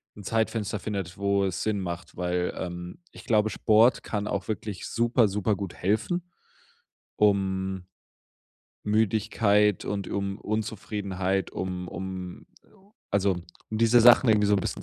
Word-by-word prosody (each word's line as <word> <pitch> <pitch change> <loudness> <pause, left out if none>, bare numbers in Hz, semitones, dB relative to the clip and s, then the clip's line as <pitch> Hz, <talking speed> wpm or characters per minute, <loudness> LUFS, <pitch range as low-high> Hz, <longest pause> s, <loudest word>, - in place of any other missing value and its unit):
'n 105 - -11
Zeitfenster 110 -1 -1
findet, 100 -5 -4
wo 100 0 +1
es 95 -3 -2
Sinn 105 -2 0
macht, 85 -2 -6
weil, 90 0 -1
ähm, 90 - -6
ich - - -13
glaube, 110 -3 +3
Sport 110 +5 +4
kann 105 -1 -3
auch 100 -2 -3
wirklich 105 -3 -4
super, 120 0 +2
super 105 +1 0
gut 95 -2 -6
helfen, 175 - -1 0.9
um 95 -2 +1 1.0
Müdigkeit 105 -1 +2
und 100 -2 -3
um 100 0 -3
Unzufriedenheit, 100 -3 -2
um 90 -1 -4
um 95 0 -7 0.6
also 100 -1 +2 0.4
um 110 - -2
diese 115 +1 +5
Sachen 120 +1 +7
irgendwie 105 -1 +4
so 105 - +4
'n - - 0
bisschen - - -4
100 Hz, 140 wpm, -27 LUFS, 95-110 Hz, 1.0 s, Sachen